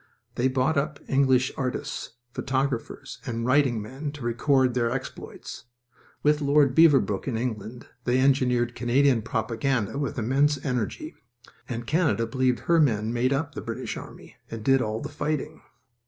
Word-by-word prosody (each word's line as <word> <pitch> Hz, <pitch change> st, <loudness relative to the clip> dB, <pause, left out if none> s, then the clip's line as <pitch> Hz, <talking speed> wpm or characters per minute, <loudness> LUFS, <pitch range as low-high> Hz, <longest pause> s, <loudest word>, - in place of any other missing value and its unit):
They 125 Hz, -, +1 dB
bought 130 Hz, +4 st, +1 dB
up 150 Hz, +1 st, -3 dB
English 130 Hz, -2 st, +3 dB
artists, 130 Hz, -3 st, -4 dB, 0.2 s
photographers, 135 Hz, -3 st, -3 dB
and 115 Hz, 0 st, -3 dB
writing 130 Hz, -3 st, +3 dB
men 135 Hz, +6 st, -6 dB
to 145 Hz, -4 st, -9 dB
record 130 Hz, +2 st, +2 dB
their 120 Hz, -1 st, +1 dB
exploits. 130 Hz, -1 st, -7 dB, 0.6 s
With 150 Hz, 0 st, +3 dB
Lord 140 Hz, -1 st, +4 dB
Beaverbrook 140 Hz, -11 st, +4 dB
in 120 Hz, -4 st, -1 dB
England 115 Hz, 0 st, -4 dB, 0.2 s
they 125 Hz, +1 st, +2 dB
engineered 125 Hz, -3 st, +2 dB
Canadian 125 Hz, +1 st, +2 dB
propaganda 115 Hz, +2 st, -1 dB
with 140 Hz, -2 st, -3 dB
immense 140 Hz, +5 st, +2 dB
energy, 130 Hz, -, -2 dB, 0.6 s
and 120 Hz, -1 st, -4 dB
Canada 155 Hz, -5 st, +1 dB
believed 125 Hz, +1 st, 0 dB
her 170 Hz, -1 st, +3 dB
men 115 Hz, -6 st, +2 dB
made 125 Hz, +2 st, +1 dB
up 145 Hz, +2 st, -1 dB
the -, -, -5 dB
British -, -, -5 dB
army -, -, -11 dB
and 115 Hz, -1 st, -6 dB
did 135 Hz, +2 st, +4 dB
all 110 Hz, 0 st, -2 dB
the -, -, -4 dB
fighting. 150 Hz, +1 st, -3 dB
130 Hz, 150 wpm, -26 LUFS, 120-140 Hz, 0.6 s, Lord